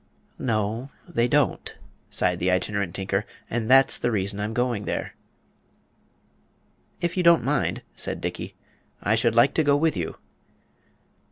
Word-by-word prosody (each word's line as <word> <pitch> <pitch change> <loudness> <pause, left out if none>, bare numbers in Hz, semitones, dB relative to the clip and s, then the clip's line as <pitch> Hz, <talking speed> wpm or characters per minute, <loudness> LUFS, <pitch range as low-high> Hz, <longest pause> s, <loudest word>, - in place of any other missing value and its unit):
"No, 110 +2 -1 0.2
they 120 -9 +1
don't," 145 +1 0 0.3
sighed 90 -1 0
the 90 - +1
Itinerant 95 0 -1
Tinker; 100 +1 -1 0.3
"and 115 -1 -1
that's 135 +1 +6
the 120 - 0
reason 100 -2 -1
I'm 105 +1 -2
going 120 -3 -1
there." - - -3 1.9
"If 175 -1 -1
you 185 - +1
don't 170 -1 +5
mind," - - 0
said - - -3
Dickey, - - -5 0.5
"I 105 - +2
should 115 0 +2
like 120 +4 +5
to 160 - +2
go 145 -1 +4
with 160 +1 +1
you." 85 -4 -3
115 Hz, 145 wpm, -25 LUFS, 100-135 Hz, 1.9 s, that's